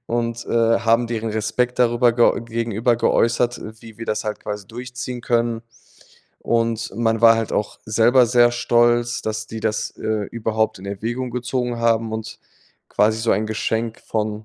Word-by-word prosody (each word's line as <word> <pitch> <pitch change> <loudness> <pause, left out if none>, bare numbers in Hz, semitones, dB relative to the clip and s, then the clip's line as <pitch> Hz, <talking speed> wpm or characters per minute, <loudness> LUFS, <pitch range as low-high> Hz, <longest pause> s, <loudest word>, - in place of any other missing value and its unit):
und, 115 0 -2
äh, 115 0 +2
haben 115 +1 +2
deren 115 -1 -3
Respekt 125 +4 -1
darüber 120 0 +4
ge 120 0 +3
gegenüber 115 +1 0
geäußert, 120 +1 +1 0.2
wie 115 -1 -13
wir 115 - -7
das 105 - -1
halt 105 - -4
quasi 105 -2 -6
durchziehen 125 +1 -6
können, 115 -1 0 0.8
und 115 -1 0
man 115 -1 +1
war 115 -1 +7
halt 115 -1 -2
auch 105 - -2
selber 120 +3 +4
sehr 120 0 +4
stolz, 120 0 +2
dass 110 0 -3
die 110 0 -7
das, 110 0 -1
äh, 110 -1 -2
überhaupt 110 -2 -1
in 100 - -9
Erwägung 120 +6 -4
gezogen 125 0 -2
haben 115 -1 +1
und 110 0 -6 0.5
quasi 110 +1 +2
so 115 - 0
ein 110 +2 0
Geschenk 110 +1 -2
von, 110 0 -3
115 Hz, 160 wpm, -21 LUFS, 110-120 Hz, 0.8 s, war